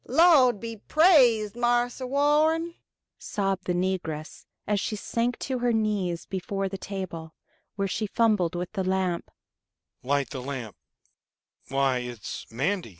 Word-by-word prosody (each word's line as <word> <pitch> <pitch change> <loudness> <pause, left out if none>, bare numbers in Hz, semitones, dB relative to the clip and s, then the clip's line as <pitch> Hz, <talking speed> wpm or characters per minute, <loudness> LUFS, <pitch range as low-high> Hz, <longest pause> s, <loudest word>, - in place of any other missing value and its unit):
"Lawd 290 - +5
be 230 0 -6
praised, 245 - +4
Marse 240 +1 +1
Warren," 300 +5 +2 0.5
sobbed 195 -2 -2
the 180 - 0
negress, 175 -4 -3 0.2
as 205 -1 +1
she 215 - -2
sank 235 +3 -1
to 260 -2 -3
her 245 0 +1
knees 205 -6 -1
before 195 +1 -3
the 195 0 -5
table, 170 -6 -6 0.4
where 195 -1 -1
she 215 +3 -2
fumbled 210 -6 +2
with 175 0 -4
the 195 -3 -2
lamp. 185 -2 -1 0.7
"Light 140 -1 0
the 130 - -5
lamp 130 -5 -6
205 Hz, 120 wpm, -26 LUFS, 180-245 Hz, 0.7 s, Lawd